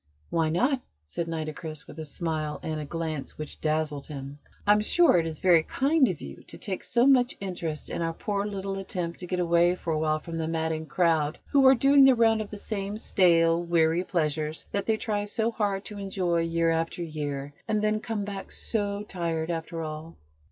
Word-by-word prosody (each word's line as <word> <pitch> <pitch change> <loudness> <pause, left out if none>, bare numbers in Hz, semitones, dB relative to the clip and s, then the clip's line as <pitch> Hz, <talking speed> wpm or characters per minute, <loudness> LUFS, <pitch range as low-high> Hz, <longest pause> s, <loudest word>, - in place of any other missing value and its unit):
"Why 165 -1 +2
not?" 250 - +1 0.2
said 165 - -4
Nitocris 155 -1 -5
with 155 - -11
a 160 - -4
smile, 155 0 -3
and 155 -1 -3
a - - -5
glance 160 -2 -4
which 155 -1 -7
dazzled 155 -2 -1
him. 140 -1 -7 0.3
"I'm 210 +1 +5
sure 305 - +4
it 165 - -1
is 160 -1 -5
very 175 -2 +5
kind 275 - +2
of 180 -7 -3
you 70 - -9
to - - -7
take 190 -2 -4
so 240 +1 +2
much 255 -3 +4
interest 170 -5 -4
in - - -3
our 165 0 0
poor 200 +4 -2
little 195 -1 -4
attempt 175 -3 -4
to 180 - -6
get 180 0 -1
away 170 0 +3
for 165 -2 -3
a 155 - 0
while 155 0 +1
from 165 +1 -6
the 160 - -1
madding 160 -1 -2
crowd 160 -4 +1
who 275 -2 +6
are 265 - +8
doing 275 +2 +6
the 265 -1 +7
round 225 -1 +4
of 210 - -6
the 210 - -7
same 200 0 -3
stale, 170 -5 +3
weary 170 0 +2
pleasures 155 -3 -2
that 200 - -2
they 220 -1 +2
try 210 -2 -1
so 220 +2 0
hard 200 -3 -1
to 210 -1 -7
enjoy 185 -3 0
year 165 0 +1
after 165 +2 -1
year, 145 -3 -4
and 215 -1 0
then 215 0 +2
come 220 -3 -3
back 200 -1 -6
so 205 -2 -2
tired, 165 -3 -2
after 165 0 -4
all." 155 +1 -7
170 Hz, 205 wpm, -27 LUFS, 160-205 Hz, 0.3 s, are